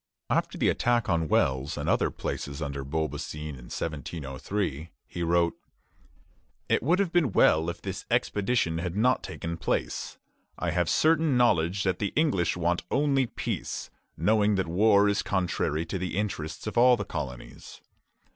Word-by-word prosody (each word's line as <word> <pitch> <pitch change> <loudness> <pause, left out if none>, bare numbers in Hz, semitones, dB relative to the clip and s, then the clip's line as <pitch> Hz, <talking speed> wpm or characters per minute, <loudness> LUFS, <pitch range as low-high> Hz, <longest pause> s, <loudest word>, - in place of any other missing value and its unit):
After - - 0
the - - +2
attack 120 -2 +1
on 80 -1 +1
Wells 65 -1 +1
and - - -3
other - - +2
places 70 0 -5
under 70 -3 -4
Beaubassin 75 +1 -3
in 65 -5 -9
1703, 75 +2 -4 0.2
he 85 - -7
wrote: 85 0 +2 1.1
"It - - +2
would 165 +9 +2
have 195 -3 0
been 170 - +2
well 80 +2 +4
if 85 - -7
this - - -5
expedition 100 -6 +1
had 90 +1 -3
not 125 +5 +3
taken 85 0 -5
place. - - -2 0.4
I 90 - -1
have 85 0 +1
certain 160 -4 +3
knowledge 95 -5 +2
that 95 -2 0
the 100 - -2
English 95 - +1
want 85 +1 +1
only 140 -3 +2
peace, - - -4 0.3
knowing 105 +4 +3
that 95 -1 0
war 100 +3 +4
is 100 0 +1
contrary 85 -4 -1
to 90 +3 -4
the 90 0 -3
interests 90 -7 -3
of 110 +2 0
all 125 0 +6
the 100 - -4
colonies. 65 -9 -7
90 Hz, 155 wpm, -27 LUFS, 80-110 Hz, 1.1 s, all